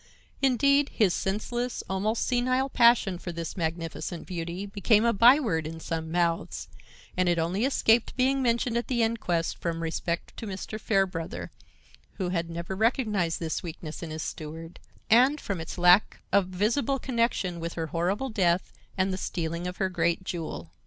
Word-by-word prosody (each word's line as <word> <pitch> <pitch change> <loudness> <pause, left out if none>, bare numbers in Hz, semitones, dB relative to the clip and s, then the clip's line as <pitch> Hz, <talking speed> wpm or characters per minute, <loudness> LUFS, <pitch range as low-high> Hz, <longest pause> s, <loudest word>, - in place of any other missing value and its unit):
Indeed, 280 +2 +3
his 205 -6 +2
senseless, 240 +5 -2
almost 205 +4 0
senile 255 +2 +1
passion 235 -8 +4
for 175 - -5
this 170 -1 -5
magnificent 165 0 -4
beauty 175 +1 -4
became 210 +2 +2
a 235 - +3
by 240 +7 +7
word 165 - -1
in 165 +1 -7
some 160 -1 -4
mouths, 170 -1 -1 0.5
and 185 -1 +2
it 175 - +2
only 175 +8 0
escaped 235 -4 +2
being 265 +1 +2
mentioned 235 -1 +1
at 235 - -2
the 240 -3 +1
inquest 180 -7 -1
from 165 -1 -2
respect 170 +1 -3
to 225 - -6
Mr. 200 +2 -5
Fairbrother, 195 -6 -1 0.6
who 185 -2 -3
had 170 -2 -1
never 170 +3 -5
recognized 210 -6 +1
this 160 -2 -2
weakness 160 -2 -7
in 170 - -5
his 155 0 -4
steward, 165 +2 -7 0.3
and 255 +7 +5
from 190 -9 -4
its 160 - -7
lack 180 +3 +5
of 200 -2 +3
visible 225 +9 0
connection 230 -9 -1
with 170 0 -4
her 165 - -3
horrible 190 +10 0
death 180 -4 +1 0.2
and 190 0 +1
the - - -2
stealing 170 0 -3
of 180 - -6
her 190 - +1
great 180 -1 0
jewel. 160 - -5
185 Hz, 165 wpm, -27 LUFS, 170-230 Hz, 0.6 s, by